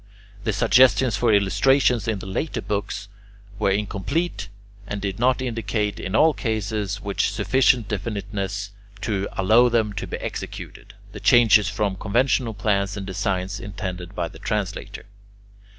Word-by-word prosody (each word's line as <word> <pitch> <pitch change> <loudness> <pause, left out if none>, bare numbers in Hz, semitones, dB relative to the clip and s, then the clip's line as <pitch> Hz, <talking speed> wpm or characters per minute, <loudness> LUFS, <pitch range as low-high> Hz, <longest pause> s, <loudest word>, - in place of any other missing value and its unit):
The 110 - +2
suggestions 120 +1 +4
for 115 +3 +2
illustrations 110 +5 +3
in 110 -2 0
the 95 - -8
later 115 +7 -3
books 100 -1 -3 0.5
were 105 - +2
incomplete, 105 - -2 0.4
and 100 - -4
did 100 0 -4
not 130 +1 +2
indicate, 110 -3 -2
in 95 +2 -3
all 155 +5 +5
cases, 105 -3 -2
with 100 -1 -5
sufficient 115 +3 +2
definiteness 100 -1 -4 0.3
to 100 -3 -1
allow 110 +6 +4
them 110 -3 +1
to 105 - -5
be - - -4
executed, - - -7 0.2
the - - -8
changes 110 -4 +5
from 100 -2 -1
conventional 115 +2 +1
plans 100 -1 0
and 100 - -5
designs 95 +1 -2
intended 95 -4 -6
by 85 - -1
the - - -13
translator. 105 -4 -4
105 Hz, 140 wpm, -23 LUFS, 100-115 Hz, 0.5 s, all